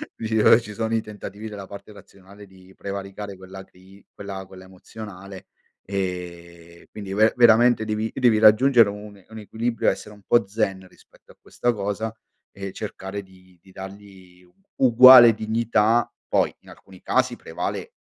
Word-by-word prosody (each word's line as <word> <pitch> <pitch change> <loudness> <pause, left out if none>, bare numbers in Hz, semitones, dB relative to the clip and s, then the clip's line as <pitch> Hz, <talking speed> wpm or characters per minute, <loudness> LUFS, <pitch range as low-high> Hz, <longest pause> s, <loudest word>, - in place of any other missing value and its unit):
dici: 110 -1 -3
"Ora 110 - +6
ci 105 -2 -10
sono 115 +1 -2
i 110 - 0
tentativi 105 0 -9
della 100 -2 -9
parte 100 +1 -12
razionale 100 0 -16
di 95 0 -19
prevaricare 100 +1 -7
quella 95 +1 -11
cri 95 +2 -21
quella 100 -1 -8
quella 95 0 -14
emozionale" 95 0 -12 0.4
ehm, 85 -3 -7
quindi 100 -2 -8
ve 110 +2 +3
veramente 120 -1 +4
devi 110 +1 -3
devi 120 -4 +3
raggiungere 115 +2 +5
un 100 -1 -10
un 110 - -12
equilibrio 115 +3 -2
essere 105 - -6
un 105 - -20
po' 120 -4 +2
zen 95 -3 -3
rispetto - - -23
a - - -39
questa 120 0 -2
cosa 105 +1 -4 0.4
e 100 -1 -8
cercare 100 -1 -7
di 95 -1 -22
di 95 - -20
dargli 95 -2 -13 0.3
uguale 125 -1 +8
dignità. 110 +1 0 0.2
Poi, - - +1
in - - -20
alcuni 95 -1 -17
casi, - - 0
prevale - - -6
100 Hz, 155 wpm, -23 LUFS, 95-110 Hz, 0.4 s, uguale